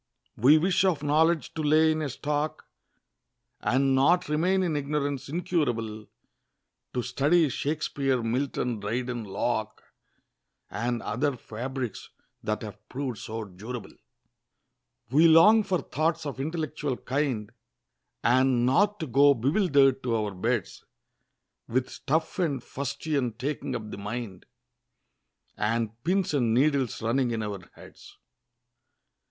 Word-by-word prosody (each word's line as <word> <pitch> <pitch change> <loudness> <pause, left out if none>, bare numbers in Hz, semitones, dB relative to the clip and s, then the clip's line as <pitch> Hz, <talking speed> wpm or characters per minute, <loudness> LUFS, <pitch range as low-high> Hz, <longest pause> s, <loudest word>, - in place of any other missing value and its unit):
We 140 +7 +6
wish 180 +4 +2
of 170 -6 +1
knowledge 160 +2 +2
to 160 - -3
lay 155 +1 +4
in 155 0 -1
a 150 - -2
stock, 150 +3 -3 0.9
And 135 +1 +2
not 175 +7 +3
remain 180 +5 +2
in 165 -4 0
ignorance 145 -1 -2
incurable; 120 - -2 0.9
To 125 - 0
study 155 +6 +3
Shakspeare, 140 -2 -1
Milton, 125 -1 -1
Dryden, 120 +3 -3
Locke, 110 +2 -2 0.9
And 120 +1 -2
other 130 +5 -1
fabrics 125 +1 -5 0.3
that 110 +1 -2
have 105 -1 -8
proved 130 -4 -4
so 110 0 -5
durable. 105 +5 -8 1.2
We 155 +5 +6
long 185 +8 +7
for 190 -4 0
thoughts 160 +2 -1
of 140 -2 -5
intellectual 150 -3 -3
kind, 130 -6 -2 0.7
And 125 0 +3
not 205 +11 +3
to - - -1
go 140 +2 +5
bewilder'd 140 - +3
to 120 -3 0
our 105 -2 -1
beds; 90 - -2 0.8
With 130 +2 -1
stuff 160 +5 -2
and 145 -8 0
fustian 140 -2 -2
taking 135 +6 -3
up 110 -2 -6
the - - -7
mind, 105 -2 -6 1.1
And 115 +1 -1
pins 185 0 +1
and 120 -5 +2
needles 135 -3 +1
running 120 +3 +1
in 115 -2 -2
our 105 -2 -4 0.2
heads! - - -15
135 Hz, 125 wpm, -27 LUFS, 115-155 Hz, 1.2 s, long